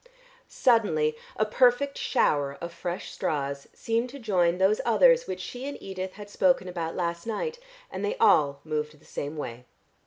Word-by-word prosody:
Suddenly 160 Hz, -11 st, +2 dB, 0.2 s
a 215 Hz, -, +1 dB
perfect 250 Hz, +5 st, +3 dB
shower 140 Hz, -, +1 dB
of 170 Hz, 0 st, -6 dB
fresh 175 Hz, +1 st, -5 dB
straws 140 Hz, -2 st, -3 dB
seemed 230 Hz, +2 st, -1 dB
to 280 Hz, -, -9 dB
join 180 Hz, -8 st, +1 dB
those 190 Hz, +3 st, +3 dB
others -, -, +5 dB
which -, -, -4 dB
she 250 Hz, +2 st, -6 dB
and 285 Hz, -, -6 dB
Edith 190 Hz, -1 st, -6 dB
had 205 Hz, -1 st, -10 dB
spoken 265 Hz, -5 st, +2 dB
about 170 Hz, -2 st, -4 dB
last 170 Hz, +1 st, -2 dB
night, 465 Hz, -, -3 dB, 0.3 s
and -, -, -5 dB
they 460 Hz, +4 st, -1 dB
all 140 Hz, -, +4 dB
moved 150 Hz, -1 st, -3 dB
the -, -, -23 dB
same 145 Hz, +2 st, -5 dB
way. 125 Hz, -4 st, -6 dB
185 Hz, 165 wpm, -27 LUFS, 155-240 Hz, 0.3 s, others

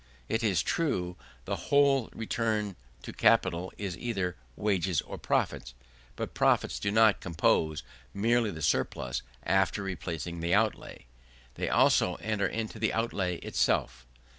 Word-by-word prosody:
It 115 Hz, -, -1 dB
is 100 Hz, -5 st, +2 dB
true 90 Hz, -, -1 dB, 0.3 s
the -, -, -2 dB
whole 140 Hz, -3 st, +4 dB
return 110 Hz, -3 st, -1 dB, 0.3 s
to -, -, -7 dB
capital 90 Hz, +2 st, +2 dB
is 100 Hz, -4 st, -4 dB
either 95 Hz, -6 st, -2 dB, 0.2 s
wages 95 Hz, -5 st, +1 dB
or -, -, -8 dB
profits; -, -, -1 dB, 0.4 s
but -, -, -5 dB
profits -, -, +2 dB
do 100 Hz, -, -1 dB
not 110 Hz, 0 st, +5 dB
compose 80 Hz, -2 st, +1 dB, 0.3 s
merely 115 Hz, -, +2 dB
the 80 Hz, -5 st, -6 dB
surplus 60 Hz, -4 st, 0 dB, 0.2 s
after 95 Hz, +1 st, +1 dB
replacing 85 Hz, -3 st, -4 dB
the 85 Hz, +3 st, +1 dB
outlay; 110 Hz, -, -1 dB, 0.5 s
they -, -, -3 dB
also -, -, +4 dB
enter 105 Hz, -2 st, -1 dB
into 110 Hz, 0 st, -4 dB
the 110 Hz, -, +1 dB
outlay 100 Hz, -6 st, -1 dB
itself. 65 Hz, -1 st, 0 dB
100 Hz, 135 wpm, -29 LUFS, 85-110 Hz, 0.5 s, not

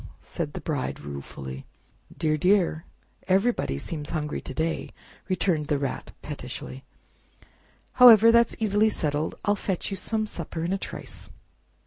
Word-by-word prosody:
said 155 Hz, -4 st, -5 dB
the -, -, -6 dB
Bride 145 Hz, -5 st, -3 dB
ruefully. 70 Hz, -2 st, -7 dB, 0.5 s
"Dear, 155 Hz, -1 st, +1 dB
dear! 180 Hz, -1 st, +2 dB, 0.4 s
everybody 195 Hz, -, +1 dB
seems 150 Hz, -, -5 dB
hungry 150 Hz, -2 st, -3 dB
to -, -, -7 dB
day!" 160 Hz, 0 st, -1 dB, 0.4 s
returned 175 Hz, -5 st, +1 dB
the 145 Hz, -, +1 dB
Rat 140 Hz, -1 st, -4 dB
pettishly; 135 Hz, -2 st, -7 dB, 1.2 s
"however, 230 Hz, -2 st, +10 dB
that's 235 Hz, 0 st, +4 dB
easily 215 Hz, 0 st, +3 dB
settled—I'll 155 Hz, +3 st, -1 dB
fetch 190 Hz, -1 st, -3 dB
you 195 Hz, -, -2 dB
Some 215 Hz, +3 st, -1 dB
supper 170 Hz, -4 st, -5 dB
in 175 Hz, +3 st, -1 dB
a 195 Hz, -, -1 dB
trice." -, -, -8 dB
165 Hz, 130 wpm, -26 LUFS, 145-200 Hz, 1.2 s, however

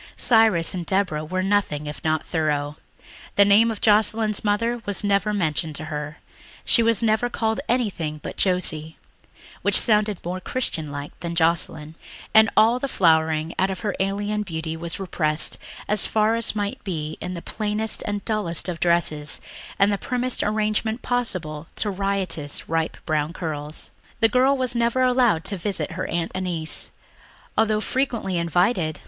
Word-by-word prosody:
Cyrus 220 Hz, -8 st, +4 dB
and 180 Hz, -2 st, -3 dB
Deborah 185 Hz, -4 st, 0 dB
were 185 Hz, +4 st, -2 dB
nothing 195 Hz, -7 st, 0 dB
if 150 Hz, 0 st, -7 dB
not 155 Hz, -1 st, 0 dB
thorough. 150 Hz, -3 st, -1 dB, 0.6 s
The 200 Hz, -, +6 dB
name 210 Hz, +3 st, +5 dB
of 220 Hz, -, -5 dB
Joscelyn's 215 Hz, 0 st, +3 dB
mother 230 Hz, +3 st, 0 dB
was 205 Hz, 0 st, +1 dB
never 200 Hz, 0 st, +1 dB
mentioned 160 Hz, -5 st, -1 dB
to 155 Hz, -, -4 dB
her; 150 Hz, 0 st, -5 dB, 0.5 s
she 235 Hz, -, +5 dB
was 230 Hz, -1 st, +3 dB
never 220 Hz, +2 st, +2 dB
called 220 Hz, -2 st, -1 dB
anything 190 Hz, -11 st, -1 dB
but -, -, -6 dB
Josie, 160 Hz, -4 st, +2 dB, 0.6 s
which -, -, +6 dB
sounded 210 Hz, -3 st, +2 dB
more 180 Hz, +2 st, -3 dB
"Christian 170 Hz, -, -2 dB
like" 145 Hz, 0 st, -6 dB
than 170 Hz, 0 st, -4 dB
Joscelyn; 160 Hz, -2 st, 0 dB, 0.4 s
and 220 Hz, -1 st, +7 dB
all 230 Hz, +3 st, +5 dB
the 275 Hz, -, -2 dB
flowering 160 Hz, -, +2 dB
out 190 Hz, -, +2 dB
of 190 Hz, -, -5 dB
her 210 Hz, -3 st, -1 dB
alien 205 Hz, +2 st, -1 dB
beauty 160 Hz, -4 st, -4 dB
was 170 Hz, +2 st, -4 dB
repressed 155 Hz, -5 st, -1 dB, 0.3 s
as 210 Hz, 0 st, +3 dB
far 215 Hz, 0 st, +2 dB
as 230 Hz, -1 st, +1 dB
might 205 Hz, -1 st, -3 dB
be 155 Hz, -5 st, -4 dB
in 180 Hz, -, -4 dB
the 170 Hz, -, -6 dB
plainest 215 Hz, 0 st, -2 dB
and 205 Hz, -1 st, -3 dB
dullest 205 Hz, -7 st, -1 dB
of 175 Hz, -2 st, -4 dB
dresses 165 Hz, -4 st, +1 dB, 0.4 s
and 195 Hz, +1 st, +4 dB
the 200 Hz, -, -1 dB
primmest 250 Hz, 0 st, 0 dB
arrangement 215 Hz, +2 st, -1 dB
possible 180 Hz, -11 st, -2 dB
to 210 Hz, -, -1 dB
riotous 190 Hz, -6 st, -2 dB
ripe 165 Hz, 0 st, -1 dB
brown 155 Hz, +1 st, -1 dB
curls. 155 Hz, -3 st, -6 dB, 0.3 s
The 225 Hz, -1 st, +4 dB
girl 260 Hz, +4 st, +3 dB
was 255 Hz, -2 st, 0 dB
never 235 Hz, +2 st, +1 dB
allowed 245 Hz, -9 st, +3 dB
to 200 Hz, -, -2 dB
visit 190 Hz, +1 st, -3 dB
her 185 Hz, +3 st, -4 dB
Aunt 170 Hz, 0 st, -2 dB
Annice, 175 Hz, -4 st, -1 dB, 0.7 s
although 215 Hz, -1 st, +2 dB
frequently 235 Hz, -9 st, -1 dB
invited. 170 Hz, -1 st, +1 dB
195 Hz, 160 wpm, -23 LUFS, 160-215 Hz, 0.7 s, and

